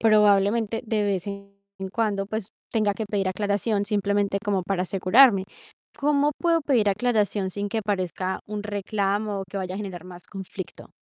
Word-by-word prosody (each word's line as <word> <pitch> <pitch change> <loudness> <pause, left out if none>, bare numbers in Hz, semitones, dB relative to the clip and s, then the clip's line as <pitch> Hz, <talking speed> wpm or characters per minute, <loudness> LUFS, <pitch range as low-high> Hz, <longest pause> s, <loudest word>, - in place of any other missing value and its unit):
probablemente 215 +1 +4
de 215 -1 0
vez 195 -2 -1
en 200 0 -7 0.4
cuando, 205 -4 0
pues 215 -2 -4 0.2
tenga 215 -3 +2
que 220 0 -4
pedir 200 -2 -1
aclaración 205 +2 0
simplemente 205 -1 +1
como 195 -3 +1
para 185 0 -1
asegurarme. 195 +3 +5 0.5
¿Cómo 290 0 +2
puedo 335 -1 +3
pedir 245 -8 +3
aclaración 210 -2 +1
sin 205 +2 -3
que 225 0 0
parezca 190 -2 -2
un 210 0 -4
reclamo 205 0 -1
o 195 - -4
que 200 - -6
vaya 185 -1 -3
a - - -4
generar 185 -4 -6
más 180 -1 -11
conflicto? 190 -2 -7
205 Hz, 165 wpm, -25 LUFS, 195-215 Hz, 0.5 s, asegurarme